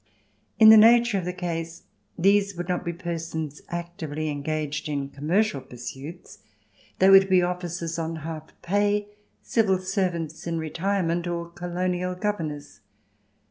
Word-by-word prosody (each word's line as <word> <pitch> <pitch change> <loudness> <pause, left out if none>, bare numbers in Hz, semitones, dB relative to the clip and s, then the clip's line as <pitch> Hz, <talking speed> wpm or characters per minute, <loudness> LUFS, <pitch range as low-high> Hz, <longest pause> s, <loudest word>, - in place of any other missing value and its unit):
In 220 -1 +9
the 220 - +10
nature 230 -1 +6
of 180 - -5
the 180 - -1
case 165 -2 -5 0.3
these 200 +2 +3
would 175 0 -4
not 180 -1 -1
be 170 - -2
persons 165 -3 -5
actively 165 -3 -4
engaged 150 +1 -3
in 140 -2 -2
commercial 150 +4 0
pursuits; 135 +7 -9 0.6
they 190 +1 +5
would 195 0 +7
be 185 -1 +5
officers 175 -2 -3
on 165 0 -3
half 160 -1 -6
pay, 205 +2 +1 0.3
Civil 210 -5 +2
Servants 175 -4 -2
in 165 -1 -1
retirement, 170 +1 -1
or 170 -1 -3
Colonial 180 +1 -2
Governors. 165 -8 -4
175 Hz, 135 wpm, -25 LUFS, 160-190 Hz, 0.6 s, the